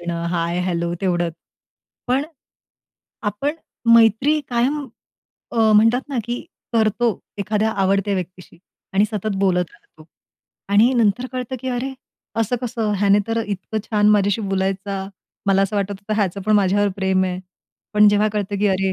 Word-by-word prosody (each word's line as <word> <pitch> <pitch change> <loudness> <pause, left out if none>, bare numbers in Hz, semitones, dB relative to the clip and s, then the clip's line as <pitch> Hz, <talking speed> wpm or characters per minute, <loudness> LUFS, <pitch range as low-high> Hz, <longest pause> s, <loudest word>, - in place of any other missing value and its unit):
देणं, 170 -1 -3
हाय-हॅलो 170 0 -1
तेवढंच. 175 -3 0 0.7
पण 260 +3 +1 1.0
आपण 220 +8 -1 0.4
मैत्री 230 +7 +4
कायम 265 +5 0 0.7
अ, - - -5 0.2
म्हणतात 225 +4 +4
ना, 275 -4 -2
की 240 +2 -3 0.3
करतो 225 +1 +2 0.3
एखाद्या 210 +2 0
आवडत्या 195 0 +1
व्यक्तीशी 180 -2 -7 0.4
आणि 200 +2 +5
सतत 215 -1 -2
बोलत 180 -2 +2
राहतो. 160 -9 -20 0.6
आणि 215 +6 +5
नंतर 235 +1 +2
कळतं, 255 0 -4
की 260 - -4
अरे, 255 +2 -2 0.5
असं 225 +3 0
कसं? 225 -3 -1
ह्याने 200 0 +4
तर 225 0 0
इतकं 205 +2 -3
छान 210 -1 +2
माझ्याशी 205 +1 +2
बोलायचा, 195 0 -2 0.4
मला 195 0 +4
असं 195 +2 -1
वाटत 200 0 -1
होतं 215 +1 -2
याचं 195 0 -3
पण 215 - +3
माझ्यावर 205 +1 +3
प्रेम 190 -1 +1
आहे. 180 0 -3 0.5
पण 210 0 +7
जेव्हा 205 +1 +3
कळतं, 205 -1 -2
की 210 - +2
अरे, 190 0 +1
205 Hz, 145 wpm, -21 LUFS, 190-225 Hz, 1.0 s, पण